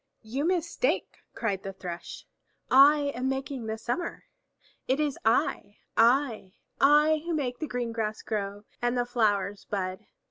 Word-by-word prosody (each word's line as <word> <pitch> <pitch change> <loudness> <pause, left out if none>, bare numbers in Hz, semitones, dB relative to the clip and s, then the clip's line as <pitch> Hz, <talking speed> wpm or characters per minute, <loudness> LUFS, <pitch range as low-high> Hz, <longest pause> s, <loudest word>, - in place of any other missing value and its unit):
"You 260 +7 -2
mistake," 350 +6 0 0.2
cried 200 -5 -1
the 195 0 -6
Thrush. 180 -2 -7 0.5
"I 285 +2 +6
am 255 +2 -1
making 265 -3 -3
the 220 0 -3
summer! 245 +10 -3 0.6
It 265 +3 +1
is 295 -3 -1
I, 215 -2 +1 0.2
I, 230 -5 +3 0.3
I 300 +2 +5
who 340 -1 -2
make 250 -5 -2
the 310 - -3
green 245 -3 -3
grass 220 -1 -3
grow 205 -1 -3 0.2
and 240 +1 +1
the 245 - +1
flowers 205 -4 0
bud. 185 -2 -3
245 Hz, 145 wpm, -28 LUFS, 210-285 Hz, 0.6 s, I